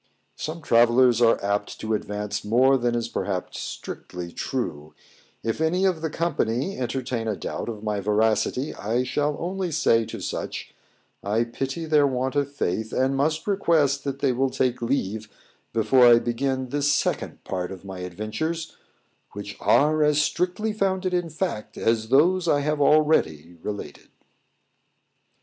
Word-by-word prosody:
_Some 160 +1 -5
travellers 120 0 +4
are 115 -1 +5
apt 100 +1 -1
to 110 0 -2
advance 105 -1 -3
more 125 +6 +4
than 120 -2 0
is 120 -1 -1
perhaps 95 -5 -3
strictly 90 -1 -7
true; 80 - -4 0.5
if 115 +6 -2
any 180 +4 +2
of 180 -4 +1
the 160 - -1
company 155 - -1
entertain 125 -2 -3
a 110 - 0
doubt - - -5
of 110 -2 -6
my 105 -1 -1
veracity, 110 +6 +1
I 115 +5 -1
shall 145 +3 -1
only 185 +1 -2
say 115 -7 +2
to - - -7
such, - - -5 0.5
I 105 +4 +1
pity 135 +7 -4
their 150 -2 +4
want 130 +1 -1
of 140 -1 0
faith, 110 -4 -2
and 130 +1 +1
must 155 +3 0
request 160 -8 +2
they 140 -1 0
will 130 +2 +1
take 125 -1 0
leave 110 -4 -2 0.4
before 120 +3 +5
I 120 -1 +8
begin 130 +2 -1
the 145 +3 -1
second 145 0 0
part 90 -1 -3
of 95 0 -9
my 95 -1 -7
adventures, 110 - -4 0.6
which 100 0 -7
are 155 +2 +3
as 150 0 +3
strictly 180 +8 0
founded 190 -2 0
in 175 -2 0
fact 155 - -4
as 110 -1 0
those 170 +7 +4
I 145 -3 +3
have 150 0 -1
already 115 - +3
related. 105 -1 -7
130 Hz, 150 wpm, -25 LUFS, 110-155 Hz, 0.6 s, I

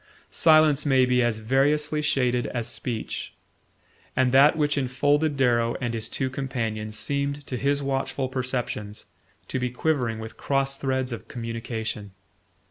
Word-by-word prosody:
Silence 155 -2 +5
may 130 -3 +4
be 125 0 +2
as 120 -2 +1
variously 150 +6 +1
shaded 125 -4 +1
as 120 -3 -3
speech; 120 -4 -4 0.8
and 130 -1 +3
that 140 +4 +6
which 150 -1 +2
enfolded 145 +3 +1
Darrow 120 -3 +2
and 120 -2 -2
his 115 -1 -2
two 130 - -1
companions 115 -5 -3
seemed 140 +1 -1
to 130 - -4
his 140 +3 0
watchful 135 0 -1
perceptions 125 -5 -4 0.4
to 130 - -2
be 125 0 -1
quivering 125 -3 0
with 110 0 -8
cross 135 0 0
threads 130 -1 -1
of 115 - -6
communication. 115 -3 -5
130 Hz, 140 wpm, -25 LUFS, 120-140 Hz, 0.8 s, that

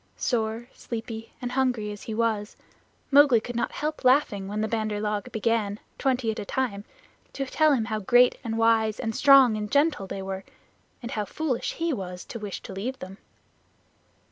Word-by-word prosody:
Sore, 225 -1 -1
sleepy, 225 -1 -6
and 245 - -2
hungry 250 -5 0
as 205 - -9
he 220 - -5
was, 220 -2 -1 0.5
Mowgli 280 -4 +7
could 240 +2 -7
not 235 - -1
help 305 0 -4
laughing 250 -7 +3
when 210 +2 -3
the 220 - 0
Bandar 215 -1 -2
log 210 -1 -2
began, 220 -2 0 0.2
twenty 255 -4 +1
at 215 - -6
a - - -3
time, 210 -4 -2 0.5
to 275 - -3
tell 310 +3 +3
him 230 -5 +1
how 220 -1 -2
great 245 +4 +4
and 225 -1 -3
wise 225 -1 +2
and 225 - -2
strong 275 -5 +7
and 210 -1 -4
gentle 285 -8 +2
they 195 0 -5
were, 190 0 -5 0.6
and 235 - -5
how 210 -1 -2
foolish 270 0 -2
he 330 -1 -1
was 180 -5 -6
to 230 - -7
wish 205 -3 -6
to - - -8
leave 240 +8 -4
them. 190 -4 -10
225 Hz, 185 wpm, -26 LUFS, 210-255 Hz, 0.6 s, Mowgli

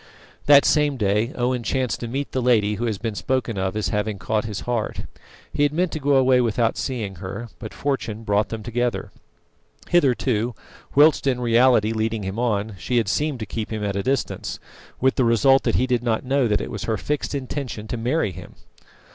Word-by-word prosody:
That 140 -1 +7
same 150 -2 +2
day 105 +2 +1
Owen 125 0 0
chanced 125 -2 -1
to 120 - -4
meet 135 +4 -3
the 130 - -1
lady 110 -4 +3
who 115 +3 -2
has 110 -4 -1
been 115 0 -3
spoken 120 +1 -1
of 95 +1 -1
as 100 -5 -1
having 105 +1 -1
caught 105 +4 -1
his 105 -3 -4
heart. 120 -3 -2 0.5
He 150 - -1
had 145 -1 +4
meant 175 +3 0
to 155 - -4
go 140 0 +2
away 130 -1 +4
without 115 -1 +1
seeing 110 -8 -4
her, 100 +6 -6
but - - -7
fortune 115 -6 -3
brought 105 0 +1
them 110 -1 -5
together. 120 -3 -2 0.8
Hitherto, 125 -7 +2 0.4
whilst 145 0 +5
in 125 -2 +1
reality 120 -2 +4
leading 110 -1 -1
him 95 +4 -4
on, 110 -3 0
she 120 +9 -1
had 115 -4 +2
seemed 150 +2 0
to - - -2
keep 110 +3 -5
him 110 -1 -3
at 100 -1 -2
a 100 - 0
distance, 135 +5 -2 0.4
with 130 +1 +2
the 130 - +3
result 130 +4 +4
that - - +1
he 130 - +3
did 125 -2 0
not 115 0 -1
know 135 -1 +2
that 105 -1 +1
it - - -5
was 105 - -5
her 110 -1 0
fixed 145 +9 -2
intention 130 -5 -5
to 120 - -3
marry 120 +1 0
him. 90 +1 -11
120 Hz, 205 wpm, -23 LUFS, 105-130 Hz, 0.8 s, That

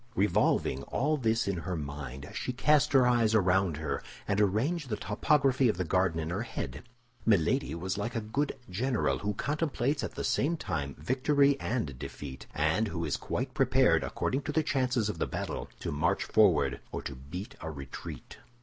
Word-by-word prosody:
Revolving 95 -9 +2
all 150 +4 +1
this 115 -6 +1
in 100 -2 0
her 90 +2 -3
mind, 70 -2 -6
she 125 - -3
cast 150 +3 +3
her 130 -2 +6
eyes 115 -3 +3
around 95 -4 +3
her, 75 -2 -2 0.3
and 100 +1 +2
arranged 130 - +1
the 105 - -1
topography 130 +4 +2
of 95 - 0
the 90 - 0
garden 90 -1 +1
in 80 +1 -3
her 95 +4 -1
head. 120 - -5 0.4
Milady 85 -7 +2
was 95 +4 -3
like 115 +4 -3
a - - +1
good 135 +7 -2
general 120 +6 0
who 105 0 -2
contemplates 145 0 -1
at - - -4
the - - -3
same 165 +5 +1
time 70 - -3
victory 140 +2 +3
and 100 - -2
defeat, 70 -1 -7
and 80 +9 +2
who 85 -4 -3
is 75 - 0
quite - - -3
prepared, - - +4
according 135 +2 -1
to 145 - -3
the 155 +2 +2
chances 130 -6 +1
of 105 - -4
the - - 0
battle, - - -4
to - - -3
march 80 +3 +1
forward 85 -11 +3
or - - -4
to - - -5
beat 75 - -7
a 80 - -4
retreat. 70 -4 -8
105 Hz, 185 wpm, -30 LUFS, 80-130 Hz, 0.4 s, her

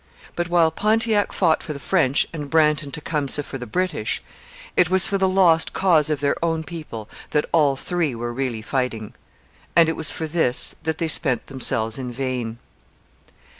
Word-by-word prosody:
But, 175 0 -2
while 170 -2 +3
Pontiac 215 +3 +1
fought 165 -4 +2
for 155 - -6
the 140 - -8
French 145 -4 +1
and 150 -3 -6
Brant 150 -1 +3
and 145 -2 -8
Tecumseh 150 -2 -1
for 135 - -7
the 125 - -7
British, 175 -11 -1 0.6
it 180 -1 +3
was 190 0 +4
for 195 - -1
the 190 0 +2
lost 175 -4 +3
cause 165 -6 +3
of 150 -2 -1
their 140 - +1
own 165 -1 0
people 150 -9 -8 0.2
that 150 -1 +1
all 150 -4 +3
three 160 -2 -2
were 120 +1 -4
really 120 -4 -3
fighting; 120 -4 -3 0.6
and 170 -1 +6
it 160 - -1
was 155 - 0
for 160 - -4
this 155 -6 +1
that 160 -1 -2
they 165 - -1
spent 140 -6 +3
themselves 115 -4 0
in 125 -2 -5
vain. 125 -3 -3
155 Hz, 180 wpm, -22 LUFS, 130-170 Hz, 0.6 s, and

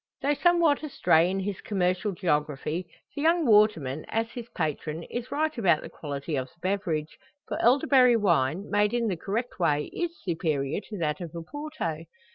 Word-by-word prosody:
Though 285 +2 +3
somewhat 335 -1 +3
astray 175 - +3
in 190 +1 -1
his 195 0 -4
commercial 190 0 0
geography, 160 -1 -1 0.3
the 285 - -3
young 330 +1 +3
waterman, 205 - +3
as 225 +1 -1
his 240 -1 -8
patron, 155 0 -3
is 240 +6 -5
right 310 +2 0
about 170 -8 +3
the - - -8
quality 145 +1 -5
of 130 -1 -2
the 170 - -26
beverage; 175 -5 -2 0.3
for - - -3
elderberry 255 -1 +5
wine, 170 -2 +1
made 210 +2 +2
in 235 -2 +1
the 185 - -1
correct 215 +7 -4
way, 150 -4 +1
is 345 -1 -3
superior 155 -3 -1
to 210 - -5
that 160 +1 -1
of 170 -2 -7
Oporto. 170 - -5
190 Hz, 170 wpm, -27 LUFS, 160-240 Hz, 0.3 s, elderberry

